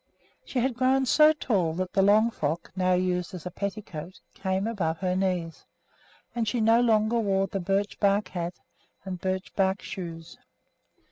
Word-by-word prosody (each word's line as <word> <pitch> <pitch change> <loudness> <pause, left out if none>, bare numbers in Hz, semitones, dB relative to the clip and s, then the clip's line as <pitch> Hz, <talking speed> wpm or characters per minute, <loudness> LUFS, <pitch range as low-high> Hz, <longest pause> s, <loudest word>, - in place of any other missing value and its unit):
She 270 - -6
had 250 +1 +1
grown 260 +2 +2
so 305 +4 +6
tall 200 - 0
that 185 0 -3
the 195 - +3
long 215 +4 +4
frock, 160 -2 -3
now 185 -1 +2
used 180 0 0
as 175 - -9
a 180 - -4
petticoat, 190 -3 -6
came 190 +1 -1
above 180 -8 -1
her 180 0 -1
knees, 180 -3 -2 0.7
and 235 -2 -1
she 235 +3 0
no 225 +2 +4
longer 225 0 +3
wore 195 -3 +1
the 195 +1 -4
birch 195 +3 -1
bark 200 -1 +2
hat 175 -1 -4 0.5
and 185 -2 -5
birch 190 0 -3
bark 190 0 +1
shoes. 165 -3 -7
195 Hz, 165 wpm, -27 LUFS, 180-220 Hz, 0.7 s, so